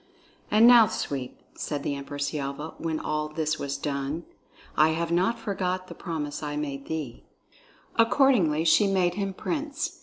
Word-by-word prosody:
"And 215 Hz, +2 st, +6 dB
now, 240 Hz, -2 st, +8 dB
Sweep," 135 Hz, -9 st, -4 dB, 0.2 s
said 145 Hz, -2 st, -4 dB
the -, -, -1 dB
Empress 140 Hz, 0 st, -4 dB
Yelva, 145 Hz, +1 st, -4 dB
when 160 Hz, -1 st, -2 dB
all 150 Hz, 0 st, -2 dB
this 155 Hz, 0 st, -1 dB
was 140 Hz, 0 st, -3 dB
done, 140 Hz, +3 st, -3 dB, 0.5 s
"I 155 Hz, +1 st, +4 dB
have 170 Hz, 0 st, -2 dB
not 185 Hz, +7 st, +2 dB
forgot 185 Hz, -4 st, -2 dB
the -, -, -7 dB
promise 150 Hz, -4 st, -4 dB
that 150 Hz, -, -5 dB
I 145 Hz, -, -4 dB
made 140 Hz, -2 st, -4 dB
thee." 150 Hz, -7 st, -5 dB, 0.7 s
Accordingly 225 Hz, -, +4 dB
she 200 Hz, +5 st, +5 dB
made 185 Hz, -3 st, +2 dB
him 195 Hz, +1 st, -2 dB
prince. 300 Hz, -, -3 dB
160 Hz, 160 wpm, -27 LUFS, 145-195 Hz, 0.7 s, now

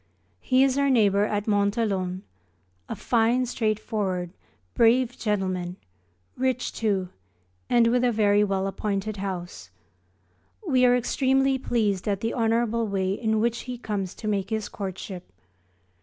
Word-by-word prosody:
He 255 Hz, +1 st, +3 dB
is 270 Hz, 0 st, +2 dB
our 280 Hz, 0 st, +2 dB
neighbour 205 Hz, -5 st, +3 dB
at 205 Hz, -1 st, -2 dB
Monthelon, 200 Hz, -3 st, 0 dB, 0.7 s
a -, -, -3 dB
fine 240 Hz, +2 st, +2 dB
straightforward, 215 Hz, -6 st, -2 dB, 0.4 s
brave 240 Hz, +2 st, +3 dB
gentleman, 185 Hz, -4 st, -2 dB, 0.6 s
rich 255 Hz, -1 st, -1 dB
too, 195 Hz, -5 st, -1 dB, 0.6 s
and 240 Hz, -1 st, +4 dB
with 245 Hz, +2 st, +2 dB
a 245 Hz, -, +3 dB
very 210 Hz, -2 st, +3 dB
well 195 Hz, -1 st, 0 dB
appointed 200 Hz, +1 st, -3 dB
house. 175 Hz, -, -6 dB, 1.0 s
We 255 Hz, -4 st, +4 dB
are 245 Hz, 0 st, +5 dB
extremely 265 Hz, +2 st, +1 dB
pleased 215 Hz, -6 st, 0 dB
at 200 Hz, -1 st, -1 dB
the 225 Hz, -, -1 dB
honourable 230 Hz, -1 st, +1 dB
way 190 Hz, -1 st, -1 dB
in 220 Hz, +1 st, 0 dB
which 235 Hz, +1 st, 0 dB
he 250 Hz, -, -4 dB
comes 205 Hz, -5 st, -4 dB
to 215 Hz, -, -7 dB
make 200 Hz, -2 st, -1 dB
his 220 Hz, -2 st, -2 dB
courtship. 190 Hz, -, -7 dB
215 Hz, 135 wpm, -25 LUFS, 195-240 Hz, 1.0 s, are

